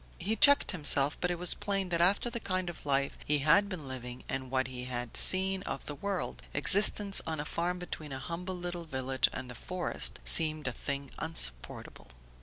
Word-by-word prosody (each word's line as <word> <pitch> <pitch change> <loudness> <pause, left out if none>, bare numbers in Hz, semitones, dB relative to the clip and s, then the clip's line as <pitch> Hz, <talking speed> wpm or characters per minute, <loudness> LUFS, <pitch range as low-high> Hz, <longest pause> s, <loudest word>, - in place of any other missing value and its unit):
He 210 +5 -2
checked 285 +3 +7
himself, 145 -5 +1
but 180 - 0
it 175 - -2
was 180 0 +1
plain 195 -2 -3
that 170 -1 +1
after 200 +7 +2
the 235 - -4
kind 185 -4 -3
of 160 - -14
life 140 0 0
he 150 - +1
had 200 +7 +4
been 170 -8 -6
living 125 -1 -7
and 130 -1 -4
what 130 0 0
he 125 0 -7
had 120 -1 -5
seen 190 0 +3
of 135 - -6
the 145 - -5
world, 195 +5 -4
existence 200 0 +5
on 160 -1 -3
a 145 - -4
farm 175 +3 -2
between 160 -4 -8
a 135 - -4
humble 180 +6 -6
little 175 -1 -5
village 130 -3 0
and 130 0 -6
the 125 - -8
forest 180 +8 -3
seemed 155 -3 +4
a - - 0
thing 140 +2 -5
insupportable. 65 - -1
165 Hz, 200 wpm, -30 LUFS, 135-185 Hz, -, checked